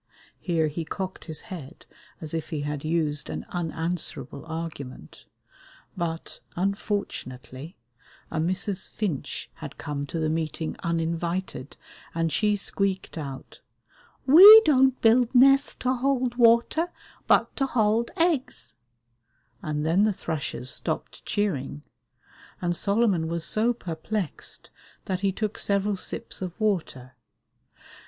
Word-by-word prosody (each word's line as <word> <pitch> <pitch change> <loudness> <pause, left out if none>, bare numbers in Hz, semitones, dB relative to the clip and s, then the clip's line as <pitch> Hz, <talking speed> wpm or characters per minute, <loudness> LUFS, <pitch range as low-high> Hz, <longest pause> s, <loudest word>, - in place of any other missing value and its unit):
Here 165 -3 +1
he 155 +3 -4
cocked 185 +3 -5
his 160 -3 -5
head 165 -4 -10 0.4
as 155 -1 -6
if 160 -1 -3
he 155 -3 -3
had 145 -1 -4
used 155 -2 0
an - - -5
unanswerable 165 -3 -3
argument; 155 - -7 0.7
but, 165 -2 -4 0.2
unfortunately, 175 - -3 0.6
a 160 - -1
Mrs. 185 +3 -2
Finch 185 -11 -4
had - - -8
come 145 -1 -4
to 165 - -4
the 160 -1 0
meeting 160 0 -2
uninvited, 170 -2 -2 0.4
and 165 -1 0
she 210 +6 +2
squeaked 195 -1 -2
out, 140 -4 -7 0.6
"We 395 +10 +11
don't 265 -3 +4
build 235 +2 +4
nests 275 +3 +6
to 255 0 +2
hold 255 -1 0
water, 240 +8 +3 0.4
but - - +3
to 270 - +1
hold 225 -1 +2
eggs," 325 - 0 0.9
and 150 0 -2
then 165 +5 +3
the 215 -1 +3
thrushes 150 -7 -4
stopped - - -4
cheering, 150 -9 -2 0.8
and 175 -1 -1
Solomon 200 -4 +2
was 170 0 -3
so 220 +6 +2
perplexed 180 -2 -5 0.3
that 185 -2 -2
he 195 0 +1
took 215 +2 -3
several 200 0 +1
sips 190 - -6
of 180 +2 -5
water. 160 - -1
175 Hz, 120 wpm, -26 LUFS, 160-215 Hz, 0.9 s, We